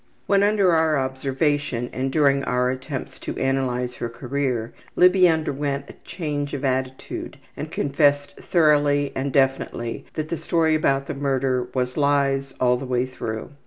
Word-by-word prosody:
When 200 -1 +3
under 200 -2 +3
our 160 -2 +3
observation, 135 -1 -1
and 130 +1 -2
during 140 -2 +3
our 125 0 +1
attempt 130 +1 -6
to - - -5
analyze 125 -2 -1
her 120 - -3
career, 125 -2 -2 0.2
Libby 180 0 +6
underwent 145 -3 -1
a - - -21
change 145 -4 -3
of 140 - -4
attitude 130 0 -3 0.2
and - - -5
confessed 145 0 +1
thoroughly 145 -4 +2
and 135 +1 -2
definitely 135 -3 0
that 155 -1 -3
the 170 - -2
story 160 -1 +1
about 140 -3 +1
the - - -4
murder 135 -2 0
was 125 0 -1
lies 140 -2 +1
all 125 -1 +3
the 135 - -6
way 125 0 +1
through. 115 -3 -6
140 Hz, 155 wpm, -23 LUFS, 130-150 Hz, 0.2 s, Libby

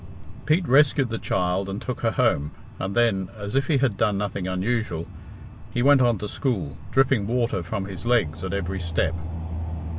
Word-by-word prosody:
Pete 160 +3 +3
rescued 135 -1 +4
the 115 -1 -3
child 90 +2 0
and 100 +1 -3
took 125 +1 -5
her 115 - +2
home, 75 -8 +1 0.3
and 95 +1 -3
then, 105 -6 +2
as 105 +1 -5
if 135 -1 +2
he 150 - +3
had 130 -7 +1
done 105 -2 +2
nothing 100 -2 -2
unusual, 95 -2 -1 0.6
he 120 - -1
went 140 -1 +6
on 120 -3 +3
to 105 - -4
school, 95 - -1
dripping 135 -6 +2
water 120 -4 0
from 95 +4 -3
his 95 -2 -8
legs 90 -9 +1
at 95 - -3
every 95 -1 -2
step. 85 -1 0
105 Hz, 180 wpm, -24 LUFS, 95-125 Hz, 0.6 s, went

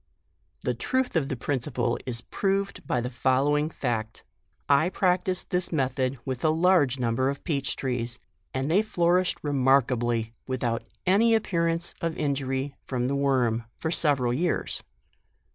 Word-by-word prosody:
"The - - 0
truth 260 -4 -1
of 150 -4 +1
the 135 - -1
principle 125 -1 -1
is 115 -2 0
proved 195 - -2
by 125 - +1
the 125 - -3
following 140 +4 +2
fact: 115 -7 -3 0.4
I 145 +5 +4
practiced 185 -1 0
this 180 0 0
method 130 -3 0
with 130 -2 -4
a 155 - +4
large 160 -5 +3
number 125 +2 +1
of 140 0 -5
peach 140 -6 -1
trees, 125 -3 -2 0.3
and 135 +3 -2
they 195 +5 +5
flourished 180 -3 +2
remarkably, 125 -5 +2
without 120 -3 -1 0.2
any 220 +5 +4
appear 170 -6 +1
ance 165 +1 +1
of 165 -1 -2
injury 135 -1 -1
from 125 -1 -1
.the 140 - 0
worm, 125 -5 +1
for 160 - -2
several 135 -8 +2
years. 170 +6 -1
140 Hz, 145 wpm, -27 LUFS, 125-170 Hz, 0.4 s, they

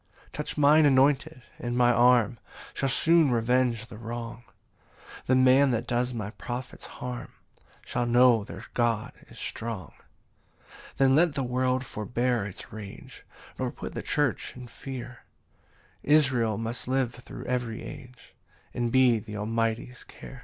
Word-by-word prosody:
7 - - -26
"Touch - - -5
mine 150 +1 +6
anointed, 135 -2 +2 0.2
and 120 0 -3
my 120 -1 +5
arm 120 -2 +4 0.3
"Shall 135 - -1
soon 160 +4 +4
revenge 120 -1 +1
the 110 -1 -12
wrong: 115 +1 -6 0.8
"The 130 - +4
man 130 +2 +5
that 120 -1 -1
does 125 +1 0
my 105 -4 -4
prophets 120 +2 -7
harm 125 -1 -7 0.5
Shall 120 - -1
know 120 -2 +5
their - - -9
God 115 -3 0
is - - -15
strong." 110 -4 -5 0.7
8 - - -23 0.2
Then 135 0 +4
let 165 0 +4
the 135 - -1
world 130 +1 0
forbear 120 0 -1
its 100 - -10
rage, 105 -2 -10 0.3
Nor - - -1
put - - -8
the - - -4
church 145 -6 -1
in 125 - -8
fear: 125 0 -8 0.8
Israel 130 -7 +3
must 115 +2 -4
live 130 -2 0
thro' 125 - -10
every 125 -2 -3
age, 125 -2 -11 0.4
And 120 -1 -1
be 125 -3 +4
th' 105 -1 -8
Almighty's 115 +3 -2
care. 135 - -12
125 Hz, 145 wpm, -27 LUFS, 115-130 Hz, 0.8 s, mine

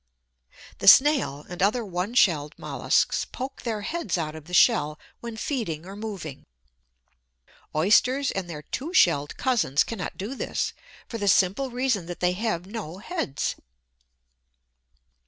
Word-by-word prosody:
The - - -3
Snail, 260 - +6
and 180 0 -7
other 215 +4 +2
one 185 +4 -3
shelled 155 -8 +3
molluscs, - - +1
poke 270 +1 -6
their 220 -3 -3
heads 225 - -2
out 155 -2 -3
of 155 -2 -10
the 180 - -12
shell 150 -2 +4 0.2
when 235 -1 -7
feeding 210 - -3
or 195 +1 -9
moving. 200 -10 -7 1.3
Oysters 250 - +3
and 190 -3 -4
their 150 -3 -7
two 315 - -5
shelled 145 - +3
cousins 225 - +2
cannot 225 -6 -6
do 205 +7 -4
this, 275 - -2 0.3
for 230 - -6
the 205 - -2
simple 195 +8 +3
reason 245 -7 -1
that 175 - -7
they 180 0 +2
have 185 -3 -2
no 195 -5 -7
heads! 210 - -3
200 Hz, 140 wpm, -25 LUFS, 170-245 Hz, 1.3 s, Snail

